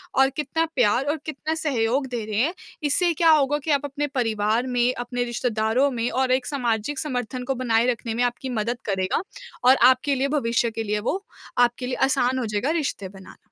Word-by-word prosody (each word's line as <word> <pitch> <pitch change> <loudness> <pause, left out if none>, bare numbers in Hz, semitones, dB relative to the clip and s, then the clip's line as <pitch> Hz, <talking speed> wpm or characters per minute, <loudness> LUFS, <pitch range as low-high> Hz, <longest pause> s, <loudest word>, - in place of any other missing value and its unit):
और 270 0 +5
कितना 305 +3 0
प्यार 245 +1 +3
और 295 +2 0
कितना 310 +1 -3
सहयोग 265 -3 0
दे 240 -3 -4
रहे 210 -1 -4
हैं। 315 +7 +1 0.3
इससे 340 +4 +2
क्या 330 +1 +3
होगा 295 -2 +3
कि 315 - -1
आप 285 0 +1
अपने 285 +1 -3
परिवार 225 0 0
में, 245 0 +1
अपने 245 0 -3
रिश्तेदारों 240 +2 0
में 240 -1 -1
और 260 0 +1
एक 255 0 +2
सामाजिक 250 0 -1
समर्थन 250 -3 -3
को 270 +1 -2
बनाए 235 -2 +1
रखने 230 -1 -4
में 240 +2 0
आपकी 245 +2 -2
मदद 235 +3 -1
करेगा 190 +4 0 0.5
और 260 - +8 0.2
आपके 265 +2 0
लिए 270 +1 0
भविष्य 230 -2 +1
के 225 0 -4
लिए 210 -1 -1
वो 390 +2 -2 0.3
आपके 245 +1 +2
लिए 255 - -2
आसान 260 -1 +1
हो 250 - -2
जाएगा 215 +5 -1
रिश्ते 295 - -2
बनाना। 190 -1 -14
250 Hz, 200 wpm, -24 LUFS, 230-280 Hz, 0.5 s, और